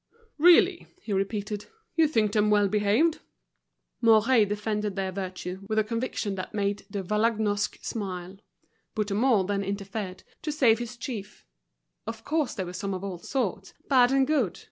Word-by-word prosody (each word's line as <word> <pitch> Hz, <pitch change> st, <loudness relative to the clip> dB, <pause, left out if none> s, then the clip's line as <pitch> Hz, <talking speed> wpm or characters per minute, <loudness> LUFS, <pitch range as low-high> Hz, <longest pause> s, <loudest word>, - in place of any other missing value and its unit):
"Really," 350 Hz, +2 st, +5 dB
he 220 Hz, -, -4 dB
repeated, 205 Hz, +1 st, -2 dB, 0.3 s
"you 325 Hz, -1 st, +5 dB
think 220 Hz, -8 st, +1 dB
them 210 Hz, 0 st, +2 dB
well 205 Hz, -1 st, +4 dB
behaved." 215 Hz, -, +2 dB, 0.8 s
Mouret 225 Hz, 0 st, +5 dB
defended 210 Hz, -1 st, -2 dB
their 190 Hz, -1 st, -2 dB
virtue 185 Hz, 0 st, -5 dB
with 220 Hz, -, -1 dB
a 215 Hz, -, +4 dB
conviction 230 Hz, -2 st, -2 dB
which 185 Hz, -, -4 dB
made 200 Hz, -1 st, -2 dB
De 200 Hz, -1 st, -4 dB
Vallagnosc 210 Hz, 0 st, 0 dB
smile. 185 Hz, -3 st, -5 dB, 0.6 s
Bouthemont 210 Hz, -1 st, +2 dB
then 200 Hz, -1 st, 0 dB
interfered, 195 Hz, -1 st, -5 dB, 0.2 s
to 305 Hz, -, -2 dB
save 245 Hz, -7 st, +4 dB
his 240 Hz, 0 st, -6 dB
chief. 225 Hz, -5 st, -7 dB, 0.6 s
Of 225 Hz, 0 st, -6 dB
course 305 Hz, -2 st, 0 dB
there 190 Hz, -4 st, -3 dB
were 180 Hz, -, -7 dB
some 195 Hz, +1 st, -3 dB
of 185 Hz, -, -6 dB
all 190 Hz, -3 st, -5 dB
sorts, 195 Hz, -3 st, -3 dB
bad 255 Hz, -2 st, +5 dB
and 270 Hz, 0 st, +4 dB
good. 260 Hz, -, 0 dB
210 Hz, 155 wpm, -27 LUFS, 195-235 Hz, 0.8 s, Really